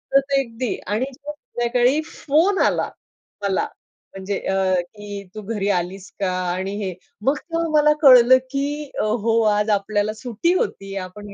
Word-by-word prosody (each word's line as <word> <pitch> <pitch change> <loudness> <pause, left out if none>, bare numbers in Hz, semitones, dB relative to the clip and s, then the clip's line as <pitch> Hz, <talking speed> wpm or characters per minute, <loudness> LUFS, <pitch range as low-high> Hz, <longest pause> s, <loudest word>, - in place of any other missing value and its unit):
तर - - +9 0.2
अगदी 235 -2 -3
आणि 220 +5 0
संध्याकाळी 260 - 0
फोन 330 +9 +1
आला - - +1 0.5
मला 195 -1 0 0.5
म्हणजे 195 +1 -3
अ, 190 -1 +1 0.2
की 205 -1 -7
तू 215 - -5
घरी 205 -1 -2
आलीस 185 +1 -2
का? 190 -2 0 0.2
आणि 190 +2 -3
हे 185 -2 -3 0.3
मग 275 +5 +2
तेव्हा 330 +1 -3
मला 300 0 +5
कळलं 255 -2 +8
की 285 +1 -2
अ, - - +1
हो 225 +1 +1
आज 210 +1 0
आपल्याला 205 +1 +1
सुट्टी 245 - -1
होती. 195 - -2
आपण 205 +2 -11
225 Hz, 150 wpm, -22 LUFS, 200-275 Hz, 0.5 s, तर